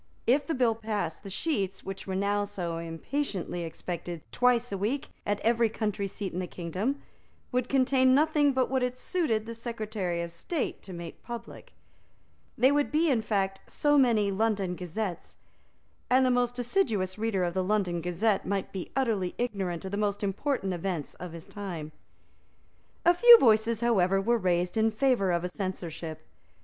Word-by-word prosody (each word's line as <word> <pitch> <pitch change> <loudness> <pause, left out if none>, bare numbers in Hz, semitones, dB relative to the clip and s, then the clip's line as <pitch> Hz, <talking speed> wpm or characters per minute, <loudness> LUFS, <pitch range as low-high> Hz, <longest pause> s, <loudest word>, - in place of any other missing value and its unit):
If 270 +5 +3
the 325 - 0
bill 245 -3 +3
passed, 215 -7 -3
the 195 - -8
sheets, 195 - -2
which 195 0 -7
were 190 - -2
now 200 +1 +1
so 180 -5 -4
impatiently 175 - -3
expected 170 0 -5
twice 245 -1 +2
a 200 - -2
week 240 +8 -1 0.2
at 205 0 0
every 230 0 +3
country 210 -2 -2
seat 195 0 -5
in 180 - -2
the 180 - -3
kingdom, 185 - -3 0.5
would 250 -1 0
contain 260 -1 +4
nothing 295 -1 +4
but 260 -1 +1
what 265 0 0
it 250 0 -1
suited 255 - -1
the 230 - -6
Secretary 215 -7 -3
of 170 - -6
State 260 - -3
to 195 - -11
make 170 -2 -8
public; 235 -1 -9 0.8
they 260 +2 +5
would 290 0 +1
be, 310 +1 +3
in 235 -4 +2
fact, 195 -3 -1
so 295 0 +2
many 230 -7 +4
London 200 -3 0
Gazettes; 180 +1 -5 0.7
and 260 +1 +5
the 255 - +3
most 245 0 +1
assiduous 225 - 0
reader 215 -4 0
of 175 -1 -1
the 185 0 0
London 185 -4 0
Gazette 190 +5 +1
might 195 -1 -2
be 190 -2 -5
utterly 220 -9 0
ignorant 195 -8 -2
of 190 - -5
the 200 - -2
most 205 -1 -1
important 200 0 -1
events 175 -4 -3
of 180 -2 -6
his 165 -1 -9
time. 175 -7 -6 1.1
A 345 - +7
few 475 +6 +10
voices, 225 - +3
however, 195 -5 +3
were 235 +4 +2
raised 180 0 0
in 220 0 +4
favour 220 -4 +2
of 170 0 0
a - - 0
censorship. 170 -4 -5
205 Hz, 175 wpm, -29 LUFS, 185-245 Hz, 1.1 s, few